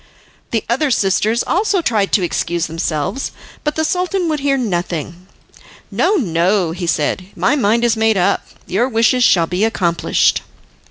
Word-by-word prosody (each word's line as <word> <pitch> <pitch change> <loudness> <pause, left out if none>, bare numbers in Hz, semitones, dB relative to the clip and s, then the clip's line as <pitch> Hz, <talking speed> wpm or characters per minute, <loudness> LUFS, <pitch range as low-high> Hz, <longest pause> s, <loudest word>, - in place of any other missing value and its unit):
The 225 - -1
other 270 +6 +1
sisters 215 0 +1
also 395 +1 +1
tried 220 - 0
to 195 - +3
excuse 170 -1 -1
themselves, 165 - -3 0.3
but 300 0 -1
the 315 - 0
Sultan 360 +1 -1
would 305 -1 -1
hear 275 0 +1
nothing. 175 - -3 0.6
"No, 420 - +2
no," 180 - +1
he 175 +1 -4
said, 165 +3 -1
"my 285 - +2
mind 235 -3 +2
is 235 -1 +3
made 220 -1 +2
up. 180 - +1 0.2
Your 240 +7 0
wishes 235 +2 +2
shall 170 -7 +4
be 180 +4 -2
accomplished." 175 -7 +1
220 Hz, 155 wpm, -17 LUFS, 175-270 Hz, 0.6 s, shall